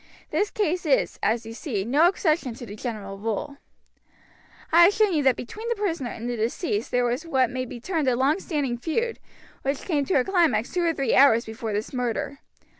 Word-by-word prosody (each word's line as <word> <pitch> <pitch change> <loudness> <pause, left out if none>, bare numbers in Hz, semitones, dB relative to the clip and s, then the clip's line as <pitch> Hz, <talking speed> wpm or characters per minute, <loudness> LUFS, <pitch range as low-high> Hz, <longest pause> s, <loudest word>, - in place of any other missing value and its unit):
This 410 - +1
case 360 -4 -1
is, 275 - +1
as 225 +1 0
you 225 - -7
see, 225 - -3
no 290 +8 +4
exception 310 - 0
to 240 - -8
the 205 -2 -8
general 205 -4 -6
rule. 225 +6 -3 1.1
"I 340 +1 +8
have 395 - +4
shown 425 -3 +3
you 305 - +2
that 265 -3 +4
between 435 - -7
the 470 - +1
prisoner 335 - -2
and 235 +1 -6
the 245 - -2
deceased 225 - -2
there 245 0 +1
was 245 +4 -1
what 265 -7 +1
may 255 0 -3
be 240 - -8
termed 320 +1 -1
a 250 - +3
long 275 +8 +2
standing 285 -10 -2
feud, 460 - -2 0.4
which 275 +1 -2
came 300 -6 +1
to 375 - 0
a 260 - +4
climax 325 - +1
two 360 - +1
or 335 - +3
three 270 -4 0
hours 235 -4 +6
before 220 0 -5
this 210 +5 -3
murder. 250 +2 -2
265 Hz, 210 wpm, -25 LUFS, 235-335 Hz, 1.1 s, I